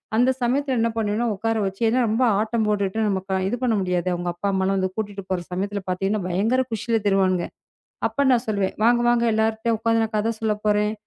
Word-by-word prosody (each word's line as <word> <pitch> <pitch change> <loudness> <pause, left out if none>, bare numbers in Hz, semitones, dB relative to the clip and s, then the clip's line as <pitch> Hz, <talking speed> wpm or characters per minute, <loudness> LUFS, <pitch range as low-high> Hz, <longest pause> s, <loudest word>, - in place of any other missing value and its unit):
அந்தச் 255 +3 +2
சமயத்துல 265 +2 +1
என்ன 230 +1 +2
பண்ணுவேன்னா, 220 +2 0
உக்கார 225 +3 -1
வச்சி 195 +2 -5
ஏன்னா 250 +3 +2
ரொம்ப 225 +4 +1 0.2
ஆட்டம் 220 +1 0
போட்டுட்டு, 200 -1 0
நமக்கா 190 -1 -2
இது 205 - -1
பண்ண 245 -3 +2
முடியாது. 180 -1 -1
அவங்க 175 0 -3
அப்பா, 175 +4 -4
அம்மா 190 0 +1
வந்து 190 0 0
கூட்டிட்டு 205 -2 -4
போற 185 - +1
சமயத்துல 200 +3 -2
பாத்தீங்கன்னா, 195 +3 -1
பயங்கர 210 +8 +1
குஷில 225 +1 0
திரிவானுங்குங்க. 185 -3 +2 0.6
அப்ப 280 - -2
நான் 245 -2 +3
சொல்லுவேன். 200 -3 0
"வாங்க, 240 +1 +4
வாங்க. 240 -1 +2
எல்லாருட்டயும் 220 +1 0
உக்காந்து 225 0 +2
நான் 220 0 -3
கதை 220 +2 +1
சொல்லப் 210 -1 -2
போறேன்" 210 0 +2
215 Hz, 195 wpm, -23 LUFS, 195-230 Hz, 0.6 s, வாங்க